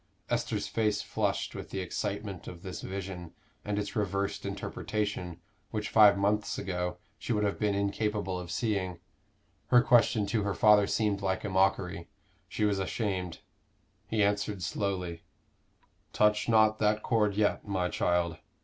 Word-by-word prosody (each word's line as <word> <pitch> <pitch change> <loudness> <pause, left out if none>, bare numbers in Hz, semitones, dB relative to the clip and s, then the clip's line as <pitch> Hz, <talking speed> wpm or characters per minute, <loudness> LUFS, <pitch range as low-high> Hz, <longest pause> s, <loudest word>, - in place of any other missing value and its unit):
Esther's - - -1
face 105 -2 0
flushed - - -1
with - - -7
the 95 - -4
excitement 100 +1 -4
of 85 -1 -9
this 95 - -6
vision 95 -3 -6 0.3
and 105 0 -2
its 105 +3 -3
reversed 100 -2 -1
interpretation, 100 -5 -3 0.3
which 105 -2 -3
five 105 -2 +7
months 105 +2 0
ago 90 -1 -3 0.2
she - - -4
would 105 -2 +1
have 100 -1 -1
been 105 -2 +1
incapable 100 -1 -1
of 90 -1 -7
seeing. 95 -2 -1 0.7
Her 120 -1 +6
question 115 -3 +4
to 110 +1 0
her 100 -1 -1
father 105 -2 +6
seemed 105 -3 0
like 95 -1 -1
a 105 - -2
mockery; 95 -2 +1 0.4
she 105 - 0
was 100 -2 +1
ashamed. 95 -3 -2 0.7
He 110 -2 +1
answered 100 -1 0
slowly 90 -5 -2 0.9
"Touch 105 +2 +3
not 110 -1 +4
that 105 0 +2
chord 105 -4 +2
yet, 105 0 +1
my 95 -3 0
child. 85 -2 0
100 Hz, 150 wpm, -30 LUFS, 95-105 Hz, 0.9 s, five